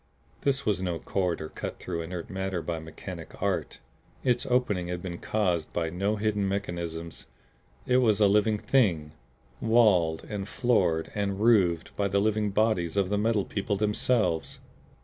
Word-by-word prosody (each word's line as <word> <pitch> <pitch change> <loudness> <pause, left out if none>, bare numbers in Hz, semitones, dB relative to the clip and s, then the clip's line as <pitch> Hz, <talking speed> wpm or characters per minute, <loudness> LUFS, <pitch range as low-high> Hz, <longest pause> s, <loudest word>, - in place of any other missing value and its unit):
This 140 0 0
was 100 -5 +1
no 90 -3 -1
corridor 85 -4 -2
cut - - -6
through 85 -2 -4
inert 85 0 -6
matter 95 -2 -3
by 85 -2 -3
mechanic 80 0 -9
art; - - -1 0.5
its 125 -1 +1
opening 115 -8 +1
had 90 0 -3
been 85 -2 -5
caused 90 -7 0
by 80 -1 -1
no 100 +5 0
hidden 105 -1 0
mechanisms! 85 -4 -4 0.6
It 125 - +3
was 110 -5 +3
a 105 - +6
living 105 +2 +3
Thing 90 - +1 0.5
walled 105 -9 +3
and 100 -2 -5
floored 95 -10 +1
and 100 -2 -2
roofed 95 -7 +3
by 100 - +1
the 100 +1 +1
living 105 0 +1
bodies 100 -4 +1
of 95 -2 +2
the 105 - +1
Metal 110 -2 +1
People 100 0 -2
themselves. 105 -3 0
100 Hz, 155 wpm, -28 LUFS, 85-110 Hz, 0.6 s, a